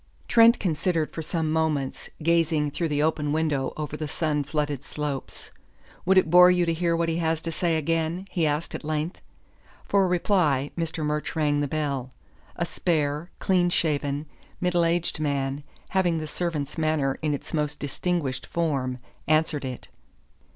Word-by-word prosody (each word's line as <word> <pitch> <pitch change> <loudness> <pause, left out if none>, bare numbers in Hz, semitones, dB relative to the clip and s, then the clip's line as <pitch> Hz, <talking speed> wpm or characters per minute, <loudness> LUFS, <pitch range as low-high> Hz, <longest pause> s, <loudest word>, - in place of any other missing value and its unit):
Trent 230 0 +6
considered 165 -2 0
for 160 - -4
some 160 -1 -1
moments, 155 -4 -1
gazing 160 -3 +2
through 165 +3 -1
the 145 -1 0
open 155 -2 0
window 150 -4 0
over 150 -1 -4
the 155 0 -4
sun 150 -1 0
flooded 145 -1 -2
slopes. 145 -2 -5 0.6
"Would 190 0 +5
it 160 -4 +4
bore 180 +1 +9
you 180 -1 +3
to 165 - +1
hear 170 0 +1
what 165 0 0
he 165 0 0
has 165 -1 0
to 165 - -3
say 165 0 +1
again?" 165 +3 -1
he 165 -3 +1
asked 150 +3 -1
at - - -5
length. 155 +3 -2 0.6
For 195 -2 +3
reply, 170 -6 +2
Mr. 165 -2 -2
Murch 150 +2 -2
rang 150 -2 +2
the 145 - 0
bell. 140 -4 -2 0.5
A 170 - -1
spare, 155 -2 -1
clean 180 -2 +2
shaven, 145 -3 0 0.3
middle 175 -1 +2
aged 170 -1 0
man, 140 -1 -1 0.3
having 180 -3 +2
the 155 - -3
servant's 155 -2 -3
manner 155 -4 +1
in 150 -2 +1
its - - -9
most 150 -1 -1
distinguished 145 -2 -2
form, 135 -7 -1 0.3
answered 155 -1 +2
it. 130 -2 -6
155 Hz, 165 wpm, -26 LUFS, 145-170 Hz, 0.6 s, bore